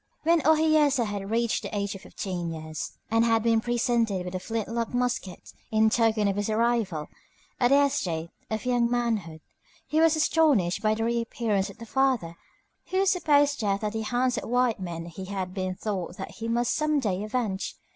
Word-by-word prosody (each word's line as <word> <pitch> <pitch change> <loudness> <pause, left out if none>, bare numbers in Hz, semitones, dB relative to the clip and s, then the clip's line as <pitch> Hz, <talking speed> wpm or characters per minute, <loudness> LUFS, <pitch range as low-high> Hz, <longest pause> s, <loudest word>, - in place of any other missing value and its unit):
When 335 +1 +4
Ohiyesa 305 -4 +4
had 200 -2 -4
reached 230 +1 +1
the 210 - -5
age 200 -1 -2
of 195 - -9
fifteen 175 -3 -4
years, 155 -1 -6 0.2
and 225 0 +4
had 225 -1 +2
been 225 -1 +3
presented 235 -5 0
with 180 - -6
a 185 - -2
flint 225 +3 -3
lock 230 +1 -3
musket 245 -7 -2 0.2
in 220 0 +3
token 220 -3 +2
of 200 0 0
his 205 +1 -1
arrival 220 -8 0 0.5
at 245 - +4
the 280 +3 +5
estate 170 - -2 0.2
of 220 0 -3
young 245 -2 +2
manhood, 220 -10 -1 0.4
he 310 - 0
was 325 -1 +5
astonished 300 - +2
by 215 -1 +2
the 225 - -2
reappearance 230 -3 0
of - - -12
the 230 - -9
father 250 -9 +1 0.5
whose 380 0 +2
supposed 290 -5 +3
death 200 -2 0
at 210 0 -1
the 220 - -2
hands 245 +3 0
of - - -8
white 245 -2 +2
men 170 -3 -5
he 175 +3 -8
had 185 -1 -4
been 185 -1 -3
taught 185 -4 -4
that 190 - -6
he 225 - -6
must 240 +1 +1
some 305 -1 +1
day 200 -7 -1
avenge. 215 -3 -2
225 Hz, 190 wpm, -27 LUFS, 195-245 Hz, 0.5 s, the